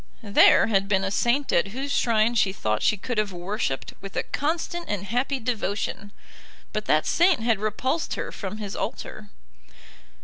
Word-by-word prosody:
There 205 -2 +6
had 195 -3 +1
been 195 -1 +2
a 195 - -1
saint 245 +7 +1
at 175 - +3
whose 265 +7 -5
shrine 230 -3 +2
she 200 -4 +2
thought 110 - -1
she 210 - +2
could 225 +3 -2
have 210 -2 0
worshipped 175 -6 -3
with 195 -1 -9
a - - 0
constant 335 +3 -2
and 200 -2 -2
happy 250 +6 -1
devotion, 205 -3 -3 0.6
but 215 0 -2
that 155 0 +2
saint 345 -6 +3
had 225 -3 +1
repulsed 255 +9 -1
her - - -4
from 200 +1 -6
his 205 -2 -6
altar. 210 -1 -5
215 Hz, 170 wpm, -25 LUFS, 195-245 Hz, 0.6 s, There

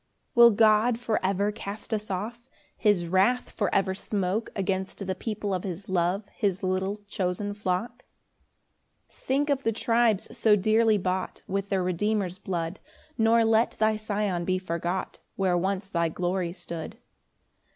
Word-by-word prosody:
1 235 - +7
Will 235 - +10
God 220 +2 +4
for 230 -3 -1
ever 200 +2 +1
cast 210 +2 -6
us 215 0 -2
off? 215 +6 -4 0.3
His 205 -5 +2
wrath 190 +8 +2
for 205 -4 -1
ever 190 -1 +2
smoke 200 +2 -2
Against 190 0 -2
the 190 - -1
people 205 +1 -3
of 185 - -2
his 190 0 -6
love, 185 +3 0
His 200 -3 -1
little 190 +2 0
chosen 200 +1 -2
flock? 205 +5 -3 1.1
2 - - -28
Think 280 +3 0
of 275 -1 +1
the 225 - +1
tribes 230 -2 +1
so 215 -2 +4
dearly 215 +2 +3
bought 185 -1 -3
With 195 +1 -3
their 190 -2 +1
Redeemer's 185 +1 -1
blood; 170 -1 -3 0.4
Nor 225 -1 +4
let 225 +1 +3
thy 215 0 +3
Sion 205 -4 -1
be 185 +1 +1
forgot, 175 0 -3 0.2
Where 190 -2 +1
once 190 +2 -1
thy 170 -3 0
glory 175 +1 -1
stood. 170 -3 -7
200 Hz, 155 wpm, -27 LUFS, 185-220 Hz, 1.1 s, Will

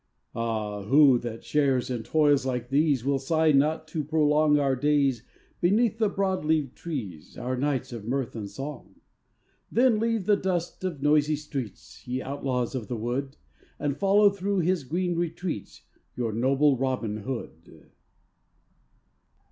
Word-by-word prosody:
Ah, 110 -3 -3
who 135 +4 +5
that 115 -1 -6
shares 135 -4 +1
in 120 -2 -2
toils 145 +2 +3
like 125 -2 -3
these 140 -3 +2
Will 140 0 +1
sigh 160 +3 +2
not 155 +3 +2
to 155 - -2
prolong 150 0 +3
Our 140 -2 +2
days 140 -3 +2 0.4
beneath 215 +5 +2
the 215 -2 +3
broad 195 -3 -1
leaved 150 -4 0
trees, 110 - -7
Our 130 +1 -2
nights 130 -1 -1
of 110 -3 -7
mirth 130 -1 -2
and 105 -3 -5
song? 135 -7 -8 0.8
Then 240 -2 +3
leave 225 -3 0
the 210 - +4
dust 180 -2 -3
of 165 -7 -4
noisy 150 +1 +3
streets, 140 -8 -7
Ye 125 +1 -2
outlaws 130 -3 -2
of 120 -6 -4
the 120 - -3
wood, 125 +5 -3 0.4
And 145 -2 -2
follow 200 +3 +4
through 200 0 -1
his 175 -3 0
green 175 +5 -1
retreats 170 - -4 0.3
Your 115 -3 -2
noble 135 +4 +3
Robin 125 -5 -2
Hood. 105 -8 -8
140 Hz, 150 wpm, -26 LUFS, 125-160 Hz, 0.8 s, who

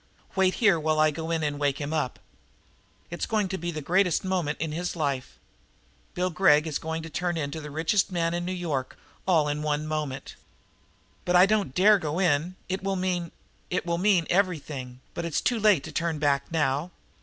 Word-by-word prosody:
"Wait 190 -1 +3
here 200 -7 +4
while 155 0 +1
I 155 0 +5
go 160 +2 -5
in 165 -1 0
and 145 -1 -2
wake 140 -1 0
him 145 +1 -3
up. 150 -5 -1 0.9
It's 175 - -3
going 215 -3 +1
to 190 - -2
be 175 +1 -3
the 155 -3 -5
greatest 180 +2 +2
moment 180 -6 -1
in 155 +1 -2
his 175 +4 -3
life! 140 -5 -2
Poor - - -36
Bill 180 +1 0
Gregg 155 -3 +4
is 155 -3 -2
going 160 0 -4
to 165 - -7
turn 175 +2 -1
into 155 +1 -3
the 150 - -7
richest 165 +7 +1
man 170 -2 0
in 175 0 -2
New 180 - -3
York 160 -8 -2
City - - -27 0.3
all 160 -5 +4
in 145 +1 -2
one 150 0 -1
moment!" 150 -3 -4 0.9
"But 180 - +1
I 180 +1 +8
don't 200 -10 0
dare 205 +2 +6
go 155 -1 -3
in. 175 -1 +1
It 190 +1 -2
will 195 0 0
mean 180 -2 -1 0.2
" - - -36
"It 180 - -1
will 170 -1 -1
mean 190 -3 +3
everything, 150 -9 -1
but 170 - -4
it's 170 -2 0
too 240 -2 0
late 205 -9 +4
to - - -7
turn 165 -2 -1
back 140 -1 0
now. 150 0 0
165 Hz, 210 wpm, -27 LUFS, 150-180 Hz, 0.9 s, I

